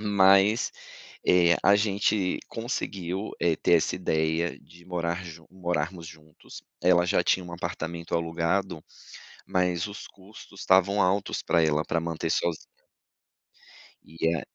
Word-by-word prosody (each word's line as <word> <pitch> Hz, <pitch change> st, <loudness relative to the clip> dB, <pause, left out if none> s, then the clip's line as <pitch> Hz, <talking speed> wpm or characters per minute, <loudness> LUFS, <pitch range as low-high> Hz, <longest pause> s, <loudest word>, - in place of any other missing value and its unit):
Mas, 100 Hz, +2 st, +4 dB, 0.6 s
eh, 85 Hz, -1 st, +5 dB
a 100 Hz, -, +6 dB
gente 100 Hz, -2 st, 0 dB
conseguiu, 100 Hz, -4 st, -4 dB
eh, 85 Hz, -2 st, +2 dB
ter -, -, 0 dB
essa 80 Hz, -, +2 dB
ideia 80 Hz, -1 st, -1 dB
de 85 Hz, 0 st, -19 dB
morar 85 Hz, 0 st, -3 dB
ju 80 Hz, -1 st, -11 dB
morarmos 85 Hz, -2 st, -3 dB
juntos, 80 Hz, -1 st, -14 dB, 0.2 s
ela 90 Hz, -1 st, +4 dB
já -, -, +2 dB
tinha 90 Hz, -, +1 dB
um 85 Hz, -, -9 dB
apartamento 85 Hz, 0 st, -5 dB
alugado, 85 Hz, +3 st, -1 dB, 0.6 s
mas 90 Hz, -1 st, 0 dB
os 100 Hz, -1 st, -9 dB
custos 100 Hz, 0 st, -15 dB
estavam 95 Hz, +2 st, +3 dB
altos 95 Hz, +2 st, 0 dB
para 85 Hz, -, +2 dB
ela 75 Hz, -1 st, +1 dB
para 85 Hz, -, -1 dB
manter 80 Hz, 0 st, -3 dB
sozinha. 85 Hz, -1 st, 0 dB, 1.4 s
E 80 Hz, +1 st, -1 dB
a -, -, -3 dB
85 Hz, 130 wpm, -26 LUFS, 85-95 Hz, 1.4 s, a